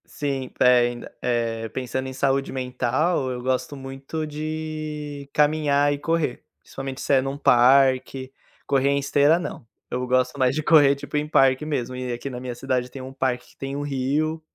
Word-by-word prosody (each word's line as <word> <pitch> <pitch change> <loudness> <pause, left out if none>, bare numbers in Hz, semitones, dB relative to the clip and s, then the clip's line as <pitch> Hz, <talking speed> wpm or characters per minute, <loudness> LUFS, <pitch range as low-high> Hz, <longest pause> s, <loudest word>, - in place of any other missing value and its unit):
Sim, 135 -3 -3
pe - - 0
ainda, 120 -1 +2
eh, 115 -2 -1
pensando 130 +1 -4
em 130 - -6
saúde 135 +1 0
mental, 130 +4 0
eu 125 -1 -5
gosto 130 +3 -1
muito 135 +3 -6
de 155 -1 -5
caminhar 145 -1 +3
e 145 - -5
correr, 160 -4 -1 0.2
principalmente 135 -1 -7
se - - 0
é 135 - +6
em 135 - -4
um 135 +1 -3
parque, 130 0 +3 0.3
correr 140 0 +2
em 140 - +2
esteira 145 +3 +3
não, 175 - -6 0.3
eu 125 +1 -2
gosto 125 +2 +1
mais 130 0 +2
de 155 - -1
correr 145 -3 +6
tipo 140 - -8
em 150 +1 -1
parque 135 -1 +3
mesmo, 130 -4 -2
e 125 -1 -4
aqui 120 +3 -4
na 125 -2 -6
minha 125 -1 -5
cidade 125 0 -1
tem 135 - -9
um 130 +1 -8
parque 130 -2 -2
que - - -27
tem 135 0 -5
um 145 - -3
rio, 145 +3 -1
135 Hz, 190 wpm, -24 LUFS, 125-145 Hz, 0.3 s, é